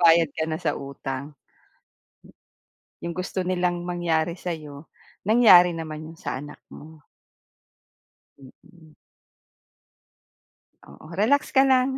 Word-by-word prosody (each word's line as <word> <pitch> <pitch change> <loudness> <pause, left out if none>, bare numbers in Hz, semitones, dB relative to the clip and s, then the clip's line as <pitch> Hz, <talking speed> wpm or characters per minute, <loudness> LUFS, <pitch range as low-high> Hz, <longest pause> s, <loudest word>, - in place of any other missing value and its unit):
Nakabayad 165 -2 +6
ka 160 - -2
na 155 - -2
sa - - -1
utang. 140 +1 -6 1.7
'Yung 170 0 -5
gusto 185 +1 -3
nilang 180 -1 -1
mangyari 175 -1 -1
sa'yo, 155 -4 -7 0.4
nangyari 190 -6 +7
naman 155 -1 -6
'yun 165 +1 -12
sa - - -3
anak 145 +2 -10
mo. 155 0 -13 1.4
Mm. 155 +4 -18 2.0
Oo, 155 - -13
relax 230 +10 +1
ka 270 - +6
lang. 265 0 +3
170 Hz, 105 wpm, -24 LUFS, 155-180 Hz, 2.0 s, nangyari